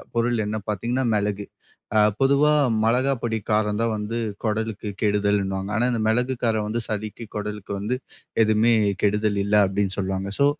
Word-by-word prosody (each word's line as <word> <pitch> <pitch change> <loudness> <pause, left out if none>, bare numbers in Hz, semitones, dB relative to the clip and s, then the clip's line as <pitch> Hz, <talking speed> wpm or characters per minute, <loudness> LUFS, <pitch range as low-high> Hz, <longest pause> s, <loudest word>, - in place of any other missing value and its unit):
பொருள் 115 -1 +1
என்ன 110 +1 -2
பாத்தீங்கன்னா 120 +6 -1
மெளகு. 100 0 -1 0.5
அ - - +6 0.2
பொதுவா 140 +3 +4 0.3
மெளகா 130 +4 +2
பொடி 115 -1 -1
காரம் 105 0 +1
தான் 115 -1 +1
வந்து 105 +2 -3 0.3
கொடலுக்கு 110 -1 -2
கெடுதல்னுவாங்க. 100 -2 0
ஆனா 120 +2 +2
இந்த 115 -2 -1
மெளகு, 125 +4 +1
காரம் 110 -2 +1
வந்து 115 +2 -2
சளிக்கு, 110 +1 -5
கொடலுக்கு 105 -1 -5
வந்து 115 +5 -1 0.5
எதுவுமே 110 +2 +3 0.3
கெடுதல் 105 0 +2
இல்ல 105 +1 +1
அப்டின்னு 95 0 -1
சொல்லுவாங்க. 95 0 -2
சோ 140 - +5
105 Hz, 155 wpm, -24 LUFS, 105-115 Hz, 0.5 s, அ